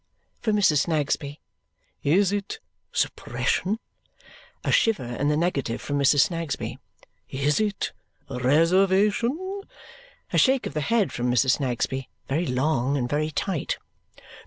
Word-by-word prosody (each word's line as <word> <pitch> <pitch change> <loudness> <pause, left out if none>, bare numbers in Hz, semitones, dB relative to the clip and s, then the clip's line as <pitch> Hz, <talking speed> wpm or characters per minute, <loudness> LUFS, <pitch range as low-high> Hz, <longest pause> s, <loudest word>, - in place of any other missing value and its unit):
from 215 -3 0
Mrs. 155 -9 +4
Snagsby. 145 -2 -1 0.6
"Is 185 +7 +3
it 205 - -3 0.3
suppression?" 205 +4 -1 0.9
A - - 0
shiver 225 - +3
in 120 +4 -2
the 150 0 +2
negative 145 -8 -1
from 145 -1 -2
Mrs. 140 0 +5
Snagsby. 165 -2 -2 0.5
"Is 140 +2 +1
it 210 -2 -1 0.4
reservation?" 195 - +2 0.7
A - - +4
shake 265 -1 +3
of - - -4
the 155 - -1
head 210 +6 +1
from 125 0 -1
Mrs. 125 +2 +3
Snagsby 130 -1 -2 0.2
very 155 +5 0
long 135 +1 +1
and 125 -3 -1
very 150 +4 0
tight. 165 +1 -2
155 Hz, 125 wpm, -25 LUFS, 140-200 Hz, 0.9 s, Mrs